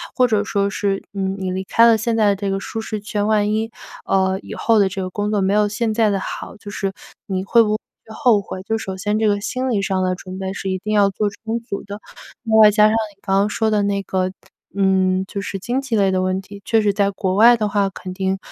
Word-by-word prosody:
或 255 Hz, -1 st, +4 dB
者 215 Hz, -3 st, +1 dB
说 200 Hz, -1 st, 0 dB
是， 195 Hz, -1 st, -1 dB
嗯， 190 Hz, -1 st, -2 dB
你 190 Hz, -1 st, -3 dB
离 185 Hz, +1 st, -3 dB
开 230 Hz, +4 st, +4 dB
了 230 Hz, -1 st, +5 dB
现 230 Hz, +1 st, -1 dB
在 210 Hz, -3 st, +3 dB
这 195 Hz, 0 st, -3 dB
个 195 Hz, -, -1 dB
舒 225 Hz, -, -5 dB
适 220 Hz, -1 st, -4 dB
圈 205 Hz, 0 st, -2 dB
万 210 Hz, -1 st, +2 dB
一， 220 Hz, +1 st, -1 dB, 0.3 s
呃， 190 Hz, 0 st, +1 dB
以 -, -, -8 dB
后 230 Hz, -1 st, +2 dB
的 200 Hz, -2 st, +4 dB
这 190 Hz, 0 st, -4 dB
个 185 Hz, -, -3 dB
工 205 Hz, +2 st, -2 dB
作 210 Hz, -2 st, +1 dB
没 190 Hz, 0 st, +1 dB
有 210 Hz, 0 st, +3 dB
现 220 Hz, +2 st, -1 dB
在 220 Hz, -2 st, +3 dB
的 195 Hz, -, 0 dB
好， -, -, -6 dB
就 205 Hz, -, -10 dB
是 195 Hz, -1 st, -3 dB, 0.3 s
你 190 Hz, -2 st, -2 dB
会 230 Hz, +4 st, +4 dB
不 210 Hz, -, -1 dB
会 -, -, -1 dB, 0.4 s
后 240 Hz, -4 st, +3 dB
悔， 190 Hz, -1 st, -7 dB
就 220 Hz, +4 st, -2 dB
首 190 Hz, -3 st, -5 dB
先 210 Hz, +2 st, -1 dB
这 220 Hz, 0 st, +2 dB
个 205 Hz, -1 st, +1 dB
心 255 Hz, +5 st, -2 dB
理 205 Hz, -4 st, +1 dB
上 190 Hz, -1 st, 0 dB
的 185 Hz, 0 st, +1 dB
准 185 Hz, 0 st, -8 dB
备 190 Hz, 0 st, -4 dB
是 195 Hz, 0 st, -4 dB
一 190 Hz, -, -1 dB
定 215 Hz, -, -2 dB
要 205 Hz, -1 st, +4 dB
做 205 Hz, +2 st, -1 dB
充 225 Hz, +3 st, -4 dB
足 225 Hz, -4 st, -6 dB
的。 205 Hz, +1 st, -8 dB, 0.4 s
另 225 Hz, -2 st, 0 dB
外 215 Hz, -1 st, +8 dB
加 210 Hz, 0 st, +3 dB
上 215 Hz, -, +4 dB
你 215 Hz, -3 st, -3 dB
刚 195 Hz, 0 st, +2 dB
刚 205 Hz, +1 st, +2 dB
说 220 Hz, +1 st, 0 dB
的 210 Hz, -1 st, +2 dB
那 200 Hz, 0 st, 0 dB
个， 185 Hz, -1 st, -1 dB, 0.4 s
嗯， 190 Hz, -1 st, +2 dB
就 200 Hz, -1 st, -5 dB
是 200 Hz, -1 st, -4 dB
经 245 Hz, +7 st, -2 dB
济 270 Hz, -4 st, -2 dB
类 195 Hz, -1 st, +3 dB
的 185 Hz, 0 st, +1 dB
问 185 Hz, 0 st, 0 dB
题， 200 Hz, +1 st, -12 dB
确 225 Hz, +1 st, +2 dB
实 205 Hz, -1 st, +2 dB
在 200 Hz, -1 st, +2 dB
国 190 Hz, -1 st, -2 dB
外 235 Hz, +4 st, +7 dB
的 215 Hz, -2 st, 0 dB
话 200 Hz, -1 st, +1 dB
肯 185 Hz, -1 st, -8 dB
定， 190 Hz, 0 st, -1 dB
205 Hz, 285 characters per minute, -20 LUFS, 190-215 Hz, 0.4 s, 外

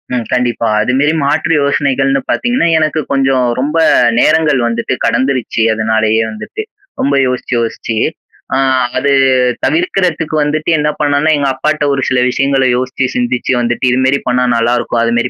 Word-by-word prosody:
ம். 120 Hz, -, -2 dB
கண்டிப்பா. 120 Hz, -2 st, 0 dB
அதுமாரி 135 Hz, +7 st, +1 dB
மாற்று 155 Hz, +3 st, 0 dB
யோசனைகள்ன்னு 135 Hz, -1 st, 0 dB
பாத்தீங்கன்னா, 245 Hz, -6 st, 0 dB
எனக்கு 155 Hz, 0 st, 0 dB
கொஞ்சம் 135 Hz, -2 st, +1 dB
ரொம்ப 150 Hz, +5 st, -1 dB, 0.4 s
நேரங்கள் 155 Hz, -3 st, +2 dB
வந்துட்டு 115 Hz, +2 st, -2 dB
கடந்துருச்சு. 130 Hz, -4 st, 0 dB
அதனாலயே 110 Hz, 0 st, +1 dB
வந்துட்டு. 410 Hz, -, -7 dB, 0.4 s
ரொம்ப 140 Hz, 0 st, +1 dB
யோசிச்சு, 125 Hz, 0 st, -3 dB
யோசிச்சு. 115 Hz, -1 st, -3 dB, 0.6 s
அ -, -, +1 dB, 0.4 s
அது 140 Hz, -, +1 dB, 0.5 s
தவிர்க்கிறதுக்கு 180 Hz, -, 0 dB
வந்துட்டு 155 Hz, +2 st, -2 dB
என்ன 150 Hz, 0 st, 0 dB
பண்ணான்னா, 145 Hz, +1 st, +1 dB
எங்க 140 Hz, -, -1 dB
அப்பாட்ட 150 Hz, +3 st, -1 dB
ஒரு 135 Hz, -, -1 dB
சில 130 Hz, -, +1 dB
விஷயங்கள 135 Hz, +1 st, +1 dB
யோசிச்சு 130 Hz, +1 st, -2 dB
சிந்திச்சு 125 Hz, +1 st, -1 dB
வந்துட்டு 120 Hz, +2 st, -1 dB
இதுமாரி 130 Hz, +2 st, +1 dB
பண்ணா 125 Hz, 0 st, +1 dB
நல்லா 115 Hz, +1 st, +1 dB
இருக்கும், 120 Hz, -1 st, -2 dB
அதுமாரி 120 Hz, +1 st, 0 dB
135 Hz, 140 wpm, -13 LUFS, 120-150 Hz, 0.6 s, நேரங்கள்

